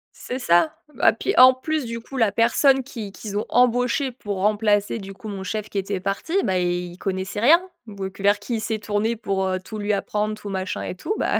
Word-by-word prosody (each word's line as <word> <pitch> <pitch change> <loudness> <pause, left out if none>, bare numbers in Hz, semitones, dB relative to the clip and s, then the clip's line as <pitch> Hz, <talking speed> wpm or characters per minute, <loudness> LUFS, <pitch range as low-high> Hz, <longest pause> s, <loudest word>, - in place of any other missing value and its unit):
C'est 255 +1 -5
ça. 245 - +3 0.2
Bah, - - +4
puis 395 - -2
en 255 +1 +9
plus, 305 +1 -2
du 230 0 -5
coup, 270 +3 -9
la 225 -4 +3
personne 265 +4 +4
qui 225 -6 -7
qu'ils 205 -1 -6
ont 210 - -1
embauché 250 +3 +2
pour 205 -5 -5
remplacer 205 +1 +1
du 195 -1 -8
coup, 215 +2 -9
mon 195 -2 -5
chef 215 +2 -4
qui - - -5
était 195 -1 -2
parti, 195 - -3
ben 190 -3 0
il 175 -1 -1
il 175 - -13
connaissait 190 +1 -3
rien. 305 +10 +6 0.3
Donc 195 -2 -7
vers, 205 +1 +3
qui 220 +4 -3
il - - -1
s'est 220 0 -2
tourné 210 +2 -1
pour, 195 -4 -1
heu, 185 0 -1
tout 215 +4 -8
lui 205 0 0
apprendre, 210 +1 -1
tout 205 - -7
machin 190 -1 -3
et - - -5
tout, 395 - -3
ben - - +1
210 Hz, 230 wpm, -23 LUFS, 195-235 Hz, 0.3 s, en